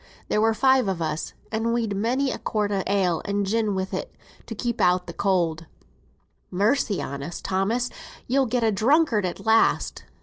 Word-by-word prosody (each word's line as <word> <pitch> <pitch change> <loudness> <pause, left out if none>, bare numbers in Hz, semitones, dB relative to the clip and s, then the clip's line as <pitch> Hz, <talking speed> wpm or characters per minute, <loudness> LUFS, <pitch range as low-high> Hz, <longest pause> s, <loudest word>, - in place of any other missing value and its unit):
There 210 - +2
were 225 0 +3
five 260 -1 +3
on 185 -3 -2
us, 160 -1 -3 0.2
and 225 +1 0
we'd 225 -4 -1
many 255 +6 0
a - - -5
quart 210 -2 -1
o' 195 -1 0
ale, 190 -4 +1
and 200 0 -1
gin 215 0 0
wi' 190 0 -1
it, - - -5 0.3
to 225 - -6
keep 235 +2 -2
out 180 0 +3
cold." 170 -5 0 0.8
"Mercy 205 +2 +1
on 140 0 -5
us, 165 +4 -6
Thomas; 210 +6 -1 0.3
you'll 265 +1 +2
get 240 +1 0
a 225 - +3
drunkard 225 - +2
at 180 - -7
last!" 225 0 +2
210 Hz, 175 wpm, -24 LUFS, 190-235 Hz, 0.8 s, were